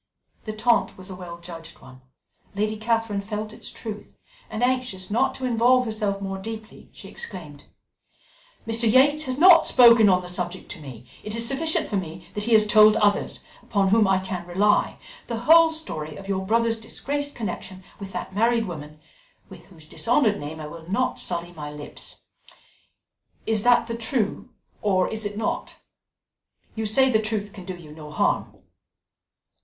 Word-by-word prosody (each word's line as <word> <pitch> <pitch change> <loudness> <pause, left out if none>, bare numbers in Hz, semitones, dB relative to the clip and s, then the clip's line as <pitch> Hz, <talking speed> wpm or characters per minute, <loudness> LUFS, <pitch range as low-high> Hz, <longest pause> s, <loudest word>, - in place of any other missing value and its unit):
The 215 - -4
taunt 230 +2 +1
was 185 +1 -9
a - - -6
well 175 -2 -8
judged 170 -1 -11
one; 130 0 -15 0.5
Lady 215 +2 -1
Catherine 225 -2 -1
felt 210 +1 -5
its - - -7
truth, 210 -2 -9 0.3
and 220 - -3
anxious 250 -7 -1
not 260 +5 +1
to 260 - -4
involve 250 +1 +3
herself 215 -3 -2
more 195 -1 -4
deeply, 220 +2 -9
she - - -12
exclaimed: 150 -7 -8 1.0
"Mr. 225 0 +1
Yates 290 +5 +4
has 260 0 -3
not 335 +1 +8
spoken 235 -4 +7
on 180 -1 +3
the - - -8
subject 180 +1 -4
to - - -7
me; 125 -5 -10 0.2
it 210 +1 -5
is 230 0 +1
sufficient 315 +5 0
for 205 - -1
me 175 -1 -6
that 210 0 -4
he 235 - +1
has 215 -1 +6
told 215 0 +6
others, 205 -2 +1 0.2
upon 200 -3 0
whom 215 0 +4
I 195 0 +3
can 185 -1 -4
rely, 205 +4 +2 0.3
the 230 -1 -4
whole 325 +5 +7
story 155 - -5
of 195 - -10
your 190 -1 -1
brother's 230 +1 +2
disgraced 285 +5 -4
connection 190 -3 -6 0.2
with 195 -1 -8
that - - -6
married 230 +2 +2
woman, 150 -4 -8 0.5
with 175 -2 -13
whose 165 -5 -14
dishonoured 230 - +1
name 150 +2 -7
I 155 - -6
will 160 +2 -10
not 255 +7 0
sully 175 -1 -3
my 150 -3 -7
lips 150 0 -10 1.2
is 220 -2 +1
that 245 +2 +4
the 230 0 -4
true, 230 -1 -2 0.3
or 190 -3 +2
is 220 -1 -5
it 205 0 -4
not? 225 - -3 1.0
You 220 -1 -3
say 265 +5 +4
the 220 -2 +3
truth 215 -2 -3
can 190 -3 -10
do 185 -1 -5
you 165 -4 -13
no 150 -1 -10
harm." 150 - -1
210 Hz, 175 wpm, -24 LUFS, 180-230 Hz, 1.2 s, not